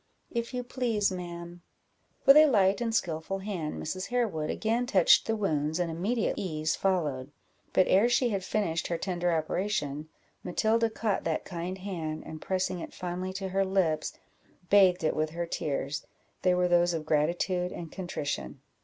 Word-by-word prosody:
"If 235 Hz, -1 st, -2 dB
you 250 Hz, -1 st, -3 dB
please, 235 Hz, -5 st, 0 dB
ma'am." 175 Hz, -1 st, -7 dB, 0.6 s
With 275 Hz, +1 st, +9 dB
a 305 Hz, 0 st, +9 dB
light 200 Hz, -5 st, +3 dB
and 235 Hz, -1 st, 0 dB
skilful 170 Hz, -3 st, -1 dB
hand, 190 Hz, -6 st, -4 dB
Mrs. 185 Hz, +4 st, -4 dB
Harewood 215 Hz, -11 st, -1 dB
again 230 Hz, +3 st, 0 dB
touched 185 Hz, -8 st, +5 dB
the 225 Hz, -, +1 dB
wounds, 155 Hz, -7 st, 0 dB
and 175 Hz, -2 st, -1 dB
immediate 205 Hz, +8 st, 0 dB
ease 155 Hz, -4 st, -1 dB
followed; 150 Hz, -8 st, -1 dB, 0.4 s
but 185 Hz, -, +4 dB
ere 205 Hz, +6 st, +4 dB
she 245 Hz, 0 st, +3 dB
had 195 Hz, -3 st, -2 dB
finished 180 Hz, -5 st, -1 dB
her 170 Hz, -, -1 dB
tender 175 Hz, 0 st, -1 dB
operation, 155 Hz, -3 st, -1 dB, 0.3 s
Matilda 225 Hz, +5 st, +1 dB
caught 220 Hz, -2 st, -1 dB
that 160 Hz, -1 st, -1 dB
kind 180 Hz, +1 st, -4 dB
hand, 170 Hz, -5 st, -4 dB
and, 155 Hz, -1 st, -8 dB
pressing 185 Hz, -1 st, -1 dB
it -, -, -8 dB
fondly 180 Hz, +1 st, -4 dB
to 190 Hz, 0 st, -4 dB
her 195 Hz, +1 st, +1 dB
lips, 190 Hz, -5 st, 0 dB, 0.6 s
bathed 190 Hz, -4 st, +5 dB
it 155 Hz, -, +1 dB
with 155 Hz, 0 st, 0 dB
her 170 Hz, +2 st, -3 dB
tears; 145 Hz, -3 st, -3 dB, 0.4 s
they 180 Hz, -1 st, +3 dB
were 180 Hz, 0 st, +2 dB
those 175 Hz, 0 st, +3 dB
of 155 Hz, -1 st, -4 dB
gratitude 175 Hz, +4 st, +1 dB
and 165 Hz, -2 st, -7 dB
contrition. 160 Hz, -7 st, -4 dB
180 Hz, 165 wpm, -29 LUFS, 160-205 Hz, 0.6 s, With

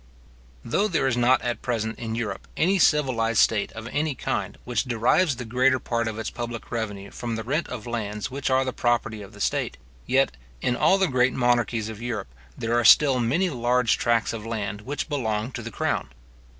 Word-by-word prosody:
Though 200 Hz, -, +1 dB
there 165 Hz, -9 st, 0 dB
is 130 Hz, -2 st, +2 dB
not 125 Hz, +1 st, +3 dB
at 120 Hz, -1 st, -2 dB
present 110 Hz, -3 st, -2 dB
in 115 Hz, -1 st, -3 dB
Europe, 115 Hz, -3 st, -4 dB
any 190 Hz, +4 st, +3 dB
civilized 125 Hz, -8 st, +2 dB
state 105 Hz, -1 st, +3 dB
of 110 Hz, +1 st, -7 dB
any 150 Hz, -1 st, 0 dB
kind 100 Hz, -4 st, -3 dB
which 120 Hz, 0 st, -1 dB
derives 125 Hz, +6 st, +2 dB
the 120 Hz, -, -6 dB
greater 130 Hz, +3 st, +3 dB
part 115 Hz, -2 st, -2 dB
of 110 Hz, -1 st, -4 dB
its 110 Hz, -, -4 dB
public 120 Hz, -1 st, -6 dB
revenue 105 Hz, -4 st, -4 dB
from 115 Hz, -2 st, -4 dB
the 110 Hz, -, -4 dB
rent 145 Hz, +8 st, -1 dB
of 120 Hz, -4 st, -6 dB
lands 105 Hz, -2 st, -4 dB
which 135 Hz, +1 st, -2 dB
are 130 Hz, 0 st, +3 dB
the 130 Hz, -, -2 dB
property 115 Hz, -3 st, 0 dB
of 100 Hz, -, -11 dB
the -, -, -13 dB
state; -, -, -1 dB, 0.3 s
yet, 135 Hz, -, +2 dB, 0.2 s
in 120 Hz, -, 0 dB
all 190 Hz, -, +4 dB
the 190 Hz, -1 st, +2 dB
great 125 Hz, -2 st, +2 dB
monarchies 120 Hz, -3 st, +1 dB
of 110 Hz, 0 st, -8 dB
Europe, 110 Hz, -, -4 dB, 0.2 s
there 115 Hz, +1 st, -2 dB
are 120 Hz, -, +3 dB
still 135 Hz, +3 st, +7 dB
many 160 Hz, +11 st, +1 dB
large 125 Hz, -2 st, +2 dB
tracts 115 Hz, -2 st, +1 dB
of 110 Hz, -2 st, -5 dB
land 110 Hz, -2 st, -4 dB
which 140 Hz, +6 st, -4 dB
belong 115 Hz, -6 st, -2 dB
to 120 Hz, -, -6 dB
the 115 Hz, -, -6 dB
crown. -, -, -2 dB
120 Hz, 205 wpm, -25 LUFS, 110-130 Hz, 0.3 s, still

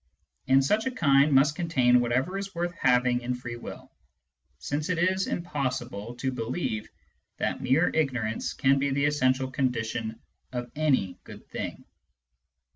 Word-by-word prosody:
And 135 Hz, +1 st, +5 dB
such 215 Hz, -, +2 dB
a -, -, +2 dB
kind 145 Hz, -, +4 dB
must 140 Hz, +2 st, +4 dB
contain 130 Hz, -8 st, +3 dB
whatever 125 Hz, +9 st, 0 dB
is 195 Hz, -1 st, -5 dB
worth 175 Hz, +1 st, -2 dB
having 125 Hz, -4 st, +2 dB
in 125 Hz, +1 st, -2 dB
free 120 Hz, -1 st, -6 dB
will, 120 Hz, -, -10 dB, 0.7 s
since 145 Hz, -, -3 dB
it 180 Hz, -, +1 dB
is 185 Hz, +2 st, +1 dB
impossible 125 Hz, -, -3 dB
to 130 Hz, +2 st, -2 dB
believe 115 Hz, -2 st, -3 dB, 0.5 s
that -, -, -2 dB
mere 145 Hz, +7 st, +3 dB
ignorance 120 Hz, -8 st, -1 dB
can 135 Hz, 0 st, +3 dB
be 140 Hz, +1 st, +1 dB
the 140 Hz, +1 st, +1 dB
essential 130 Hz, -2 st, +1 dB
condition 115 Hz, -4 st, -2 dB, 0.3 s
of 120 Hz, -1 st, -4 dB
any 135 Hz, -12 st, +1 dB
good -, -, -12 dB
thing. -, -, -5 dB
135 Hz, 145 wpm, -27 LUFS, 120-155 Hz, 0.7 s, And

